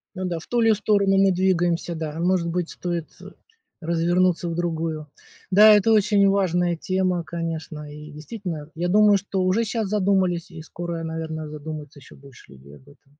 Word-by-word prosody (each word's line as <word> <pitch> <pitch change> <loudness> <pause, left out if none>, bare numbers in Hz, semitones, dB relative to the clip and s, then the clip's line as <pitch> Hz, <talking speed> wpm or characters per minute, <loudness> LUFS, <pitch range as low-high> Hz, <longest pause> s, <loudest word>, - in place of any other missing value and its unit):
Ну 185 - -4
да, 175 -2 -2
в - - -14
ту 240 -1 +1
ли 225 -1 +4
сторону 200 -1 +2
мы 195 0 +5
двигаемся, 175 -2 0
да. 160 -1 -5
Может 175 -1 +1
быть, 175 0 -2
стоит, 175 -2 -4
э, - - -11 0.5
развернуться 175 +1 +1
в 165 - -3
другую. 165 -3 -3 0.5
Да, 210 +2 +8
это 210 +2 +3
очень 205 -1 +4
важная 180 -3 +1
тема, 185 0 -1
конечно. 160 -2 -5
И 150 +1 -10
действительно, 160 -1 -7
я 175 +2 -2
думаю, 210 +1 +5
что 190 -1 -3
уже 185 +5 +2
щас 220 -2 -2
задумались 190 -3 +1
и 165 -2 -10
скоро, 170 0 -6
наверно, 160 -1 -5
задумаются 150 -1 -8
еще - - -16
больше 135 - -17
людей 70 +2 -15
об - - -18
этом. 145 -1 -22
175 Hz, 175 wpm, -23 LUFS, 160-190 Hz, 0.5 s, Да